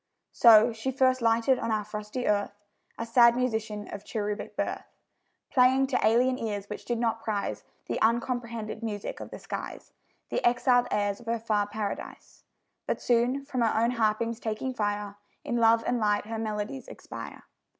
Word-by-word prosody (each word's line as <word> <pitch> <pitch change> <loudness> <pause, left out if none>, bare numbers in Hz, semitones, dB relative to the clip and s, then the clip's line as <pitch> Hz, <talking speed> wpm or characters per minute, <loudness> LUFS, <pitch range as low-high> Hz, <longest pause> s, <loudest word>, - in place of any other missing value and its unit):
So 230 0 +7
she 225 +4 -3
first 260 -1 +2
lighted 230 +3 +3
on - - -2
our 215 -1 0
frosty 210 +4 -5
earth, 205 -1 0 0.4
A 230 - -3
sad 235 0 +6
musician, 220 -4 -2
of 205 - -7
cherubic 210 -1 -4
birth, - - -3 0.6
Playing 260 +1 +4
to 265 -1 0
alien 250 +4 +3
ears 205 -3 -3
which 210 - -7
did 240 - -1
not 225 -1 0
prize 210 -2 -2 0.2
The - - -3
uncomprehended 230 -1 -1
music 210 -3 -4
of - - -8
the - - -8
skies - - -7 0.4
The - - -2
exiled 245 0 +3
airs 205 -1 0
of 235 - -16
her 230 0 0
far 215 -2 0
Paradise. 205 -1 -6 0.4
But - - -1
soon, 245 +3 +1
from 260 -3 -2
her 225 -1 +2
own 235 +2 +2
harpings 230 0 0
taking 225 +4 -3
fire, 205 -2 -2 0.3
In 240 - -1
love 230 0 +4
and 245 0 0
light 210 -1 +1
her 225 +1 -4
melodies 215 - -4
expire. - - -9
230 Hz, 170 wpm, -28 LUFS, 210-245 Hz, 0.6 s, So